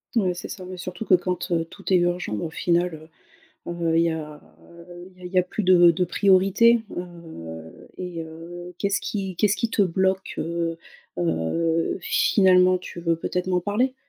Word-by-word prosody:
Ouais, 190 -5 +2
c'est 175 - -7
ça, 185 - -8
ouais 185 0 -8
surtout 180 +4 -6
que 185 - +6
quand 180 0 -3 0.2
tout 195 -1 -4
est - - +7
urgent 175 -7 0
mais 105 - -2
au - - -4
final, 170 -1 -1 0.6
heu, 170 -1 -1
il 165 - +5
y 170 - +2
a 150 -2 -6 0.8
il - - -23
y - - -19
a - - -10
il 180 - -10
y 185 - +3
a 180 - +5
plus 195 +4 -4
de 175 -2 +6
de 180 +2 +1
priorité, 195 +5 +4
heu 160 - -9
et 180 -2 -5
heu, 175 +2 -10
qu'est-ce 200 0 0
qui 195 -3 -4
qu'est-ce 210 +2 +3
qui 230 - -1
te 205 - +2
bloque? 190 +1 0
Heu 165 0 -2 0.4
heu, 90 - 0
finalement 185 -1 +4
tu 180 -1 -9
veux 170 -1 +1
peut-être 180 +2 -3
m'en 180 -1 +2
parler? 220 +8 0
180 Hz, 185 wpm, -24 LUFS, 165-190 Hz, 0.8 s, est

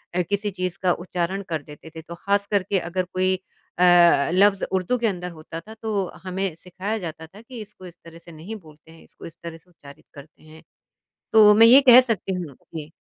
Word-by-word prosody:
अ, 180 - +2
किसी 205 +1 -1
चीज़ 185 -2 -4
का 180 - +3
उच्चारण 185 +2 -3
कर 160 -3 -2
देते 150 +2 -13
थे, 160 - -7
तो 170 +2 -10
ख़ासकर 200 +1 0
के 195 -1 -1
अगर 180 +2 -3
कोई 185 0 +1 0.4
अ, - - +4 0.5
लफ्ज़ 195 +1 +3
उर्दू 190 +7 0
के 230 - +1
अंदर 180 -3 -4
होता 160 0 -9
था, 220 +5 -13
तो 215 -3 -2 0.2
हमें 185 -2 -3
सिखाया 190 +5 -5
जाता 160 -2 -8
था 200 +6 -16
कि 235 0 -11
इसको 200 -3 -12
इस 175 0 -15
तरह 165 0 -13
से 170 - -14
नहीं 165 +8 -9
बोलते 155 -4 -16
हैं, 165 - -17
इसको - - -15
इस 165 0 -12
तरह 165 -1 -8
से 170 +2 -21
उच्चारित 140 -3 -16
करते 145 +2 -15
हैं। 155 +1 -16 0.7
तो 210 -1 +7
मैं 225 +1 +7
ये 265 +4 +8
कह 245 +1 +10
सकती 220 -6 -3
हूँ, 170 -7 -6 0.2
जी। 155 0 -7
185 Hz, 215 wpm, -23 LUFS, 165-200 Hz, 0.7 s, कह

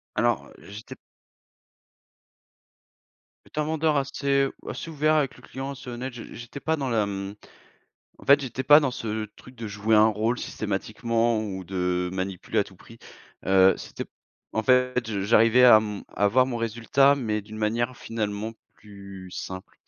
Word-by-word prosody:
Alors - - 0
j'étais 105 +2 -10
p - - -46 2.5
J'étais 155 - -4
un - - 0
vendeur 155 -1 +1
assez 140 0 +1 0.2
assez 165 - -6
ouvert 155 0 +2
avec 145 -4 +1
le - - -17
client, 135 +1 -6
assez 135 -1 -11
honnête, 125 +2 -5
je 120 -1 -8
j'étais 120 +4 -9
pas 160 0 0
dans 135 -3 -3
la, 115 -3 +2
hem 100 0 -4 0.8
en - - -15
fait, 140 +1 +6
j'étais 130 -1 -4
pas 145 +3 +8
dans 140 - 0
ce 110 -2 -3
truc 125 - -15
de 115 -1 -6
jouer 105 +2 +1
un 105 +1 +7
rôle 110 +3 0
systématiquement 115 +2 -1
ou 95 -3 -5
de 90 0 -1
manipuler 95 -1 -3
à - - +3
tout - - -16
prix, - - -16 0.5
heu. 95 0 +6
C'était - - -7 0.5
en 110 - 0
fait, 125 -1 +2
je 100 -2 -2
j'arrivais 115 +4 +5
à, 120 -3 +9
hem, 105 -2 -4
à 105 - -2
avoir 125 +5 +4
mon 125 -2 -3
résultat, 120 +5 +3
mais 110 -6 -2
d'une 110 +1 -11
manière 120 +4 -1
finalement 110 -1 -4 0.2
plus 100 -3 -12
simple 95 0 -7
115 Hz, 170 wpm, -25 LUFS, 105-130 Hz, 2.5 s, à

